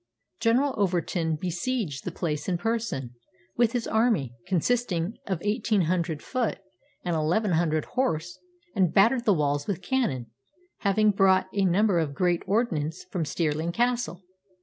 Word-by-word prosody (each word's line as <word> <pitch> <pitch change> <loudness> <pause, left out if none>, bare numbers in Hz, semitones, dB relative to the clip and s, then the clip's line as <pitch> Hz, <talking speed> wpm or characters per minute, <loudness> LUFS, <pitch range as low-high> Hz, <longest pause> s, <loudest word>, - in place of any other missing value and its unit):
General 255 +4 +2
Overton 175 -4 0
besieged 175 - -3
the 180 - -2
place 155 -1 -3
in 180 - +1
person, 220 - -2 0.4
with 235 -1 +2
his 240 -2 -1
army, 220 - +1
consisting 190 0 0
of 190 - 0
eighteen 210 -1 +1
hundred 170 -2 -1
foot 255 -3 -1 0.5
and 175 -2 0
eleven 175 +7 +1
hundred 160 -2 +1
horse, 175 -10 -2 0.4
and 185 -5 +3
battered 235 +5 +4
the 210 - +5
walls 145 -2 0
with 190 -3 -3
cannon, 135 - -1 0.5
having 210 +1 +3
brought 190 -1 +3
a 200 -1 +2
number 190 0 +3
of 145 -4 -2
great 175 0 +1
ordnance 175 -8 0
from 175 -4 -1
Stirling 160 +2 -1
Castle. 240 -3 -1
185 Hz, 145 wpm, -27 LUFS, 160-220 Hz, 0.5 s, the